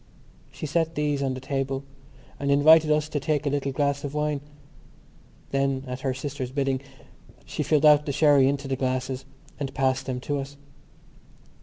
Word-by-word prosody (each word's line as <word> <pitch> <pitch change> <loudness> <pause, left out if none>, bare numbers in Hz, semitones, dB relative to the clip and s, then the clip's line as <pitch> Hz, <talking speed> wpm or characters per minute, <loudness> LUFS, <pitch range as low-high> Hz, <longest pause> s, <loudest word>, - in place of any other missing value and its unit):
She - - -6
set 165 +2 0
these 145 -1 0
on 135 -2 -1
the - - -6
table 135 0 -2 0.6
and 140 - -2
invited 155 +3 +6
us 150 0 +2
to 150 - -1
take 150 0 -1
a 145 - +1
little 140 -1 -1
glass 140 +1 0
of 145 0 -5
wine. 150 -1 -1 1.1
Then, 135 -1 0
at 125 0 -5
her 135 0 -1
sister's 135 -1 -4
bidding, 135 0 -1 0.6
she - - -4
filled 155 -1 +2
out 150 0 +6
the - - 0
sherry 145 -2 +5
into 140 0 -1
the 135 - -1
glasses 130 0 -2 0.3
and 140 -2 -3
passed 135 0 0
them 125 -1 -2
to 145 +1 -2
us. 140 +1 -7
140 Hz, 175 wpm, -25 LUFS, 135-145 Hz, 1.1 s, invited